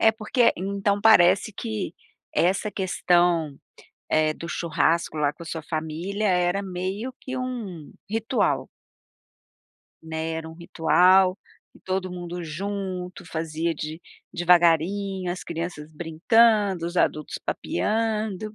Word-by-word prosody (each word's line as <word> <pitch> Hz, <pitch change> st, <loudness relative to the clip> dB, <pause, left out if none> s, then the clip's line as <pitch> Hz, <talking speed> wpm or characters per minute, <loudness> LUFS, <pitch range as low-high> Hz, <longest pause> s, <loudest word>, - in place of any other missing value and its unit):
é 220 Hz, -, +6 dB
porque, 230 Hz, +2 st, +2 dB
então, 200 Hz, +2 st, -1 dB
parece 200 Hz, -1 st, +5 dB
que 210 Hz, -4 st, -4 dB, 0.4 s
essa 195 Hz, +4 st, +1 dB
questão, 175 Hz, -5 st, +1 dB, 0.5 s
eh, 155 Hz, 0 st, +3 dB
do 170 Hz, -, -8 dB
churrasco 165 Hz, -1 st, 0 dB
lá 145 Hz, -1 st, +1 dB
com -, -, -16 dB
a -, -, -13 dB
sua 160 Hz, -1 st, -5 dB
família 165 Hz, +7 st, -3 dB
era 180 Hz, +1 st, +2 dB
meio 190 Hz, +6 st, -4 dB
que 260 Hz, 0 st, -6 dB
um 225 Hz, -11 st, -5 dB, 0.2 s
ritual. 225 Hz, +3 st, 0 dB, 1.4 s
Né. 160 Hz, 0 st, -4 dB
Era 160 Hz, 0 st, -5 dB
ritual 180 Hz, +3 st, +3 dB, 0.4 s
e -, -, -18 dB
todo 185 Hz, 0 st, -2 dB
mundo 175 Hz, 0 st, -6 dB
junto 185 Hz, +1 st, -5 dB
fazia 160 Hz, +1 st, -2 dB
de 155 Hz, +2 st, -6 dB, 0.3 s
devagarinho, 180 Hz, +2 st, +2 dB
as 180 Hz, -, -4 dB
crianças 165 Hz, -2 st, -5 dB
brincando, 185 Hz, +4 st, +3 dB
os 175 Hz, +1 st, -6 dB
adultos 155 Hz, -3 st, 0 dB
papeando 215 Hz, -, -1 dB
180 Hz, 115 wpm, -25 LUFS, 165-200 Hz, 1.4 s, é